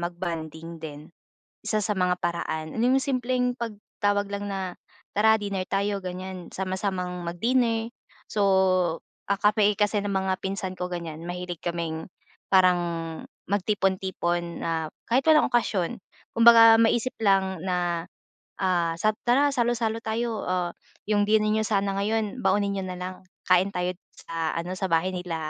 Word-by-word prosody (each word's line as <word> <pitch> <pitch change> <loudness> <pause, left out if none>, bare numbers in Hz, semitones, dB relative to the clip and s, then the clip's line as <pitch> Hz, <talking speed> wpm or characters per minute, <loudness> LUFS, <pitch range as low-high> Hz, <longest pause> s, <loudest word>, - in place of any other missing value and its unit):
mag-bonding 165 -2 -5
din. 150 +1 -9 0.5
Isa 215 - 0
sa 210 0 -1
mga 180 -1 +1
paraan 160 -2 -3
nung 250 +4 +3
simpleng 255 -2 0
pagtawag 205 -3 -2
lang 200 0 -4
na, 190 -2 -4 0.4
"Tara 220 +1 +5
dinner 200 -2 -2
tayo." 200 0 -1
Ganyan, 185 0 -6
sama-samang 185 -2 -3
mag-dinner. 225 +5 +1 0.4
So, 210 - -2 0.9
ah, 200 - +1
kami 210 0 +4
kasi 210 0 +2
ng 205 - -2
mga 190 -1 0
pinsan 190 -1 -3
ko 180 0 -4
ganyan. 165 -2 -5
Mahilig 175 -1 -6
kaming 170 0 -3 0.4
parang 185 -2 +5 0.7
magtipon-tipon 190 -3 -1
na 160 -2 -2 0.2
kahit 255 +3 +2
walang 310 -1 +6
okasyon. 205 -7 +1 0.4
Kumbaga, 230 -1 +9
maisip 230 +2 +2
lang 190 -3 +2
na, 175 -2 -1 0.5
ah, 175 -3 +1
sab 215 +5 +2 0.2
"Tara 280 +4 +4
salo-salo 230 -2 0
tayo. 225 0 -2
Ah, 180 -1 0 0.3
yung 205 -1 +1
dinner 215 0 +3
niyo 215 0 0
sana 200 -2 +1
ngayon 215 0 -1
baunin 200 +1 +2
niyo 195 -1 -3
na 180 - -5
lang. 180 +1 -5 0.3
Kain 185 +1 +4
tayo 180 -2 -2
dito 185 - -21
sa 165 -1 -2
ano, 170 +2 -3
sa 190 0 -2
bahay 170 +3 +1
nila 180 -2 -4
190 Hz, 145 wpm, -26 LUFS, 175-215 Hz, 0.9 s, Kumbaga